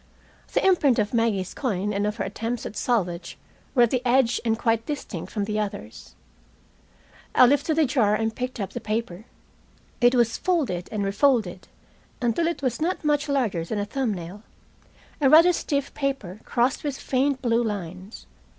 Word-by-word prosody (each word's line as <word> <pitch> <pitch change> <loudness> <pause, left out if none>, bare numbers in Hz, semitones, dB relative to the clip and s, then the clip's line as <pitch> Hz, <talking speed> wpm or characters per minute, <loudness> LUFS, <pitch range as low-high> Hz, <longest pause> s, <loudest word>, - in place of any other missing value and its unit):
The - - +1
imprint 305 -10 +4
of 210 +1 0
Maggie's 220 -5 0
coin 210 -5 -2
and 200 +1 0
of 210 - -2
her - - -3
attempts 225 +4 -4
at - - -6
salvage 180 -8 -1 0.4
were 245 - +6
at 235 - +2
the 255 - +1
edge 245 -1 +2
and 225 -1 +1
quite 225 -1 0
distinct 295 -2 -5
from 210 - -2
the 210 0 -2
others. 155 - -6 1.2
I - - +8
lifted 285 +4 +2
the 320 -1 +4
jar 230 -6 +2
and 220 0 -1
picked 250 -1 -4
up 195 - -3
the - - -6
paper. 215 -2 -3 0.8
It 245 +1 +5
was 235 -2 +2
folded 285 - -1
and 205 -2 -2
refolded 200 -3 +1 0.5
until 250 +6 +1
it 335 -4 -3
was 255 +1 -1
not 340 0 -1
much 295 0 +1
larger 235 -12 0
than 210 +6 -4
a 205 - -1
thumb 250 +2 -1
nail, 180 +1 -7 0.8
a 270 - +5
rather 335 +4 +7
stiff 280 -4 -2
paper 270 -10 -3
crossed 245 +2 0
with 285 -3 -3
faint 270 +1 0
blue 235 -1 +2
lines. 190 -2 -6
230 Hz, 175 wpm, -25 LUFS, 205-270 Hz, 1.2 s, I